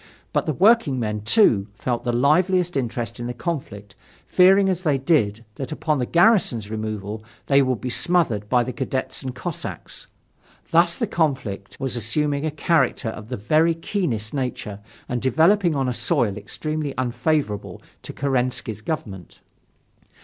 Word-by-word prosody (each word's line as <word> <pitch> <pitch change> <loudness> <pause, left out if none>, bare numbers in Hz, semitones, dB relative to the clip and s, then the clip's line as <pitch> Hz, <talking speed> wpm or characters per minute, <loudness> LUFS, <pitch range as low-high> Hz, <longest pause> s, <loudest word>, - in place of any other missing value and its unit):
But - - 0
the 155 - +1
working 195 - +4
men, 105 -2 -2
too, 105 - +3
felt 120 +2 -2
the 120 - +1
liveliest 175 +8 +2
interest 120 -4 -3
in 120 - -4
the 120 - -5
conflict, 115 - -5 0.3
fearing 195 +2 +5
as 185 -2 0
they 150 -6 +2
did 115 -6 +1
that 135 - -5
upon 155 -1 -1
the 125 - -1
garrison's 170 - +3
removal 110 -1 -4 0.2
they 140 0 +4
would 130 -4 0
be 125 +5 -4
smothered 125 - +1
by 125 -1 +3
the 125 +1 -5
cadets 130 +1 -2
and 130 -2 -5
cossacks. - - -6 0.6
Thus 170 +1 +4
the - - 0
conflict 130 - -2
was 135 -2 -2
assuming 140 +6 0
a - - +1
character 145 -6 +1
of 110 0 -8
the 125 - -3
very 155 +10 +2
keenest 150 - -2
nature 125 -7 -4 0.3
and 125 -1 -2
developing 165 - +3
on 135 -2 0
a 125 - 0
soil 120 - 0
extremely 150 +7 -4
unfavorable 125 -3 -1 0.2
for - - -8
Kerensky's 125 -5 -1
government. 100 - -6
130 Hz, 155 wpm, -23 LUFS, 110-160 Hz, 0.6 s, fearing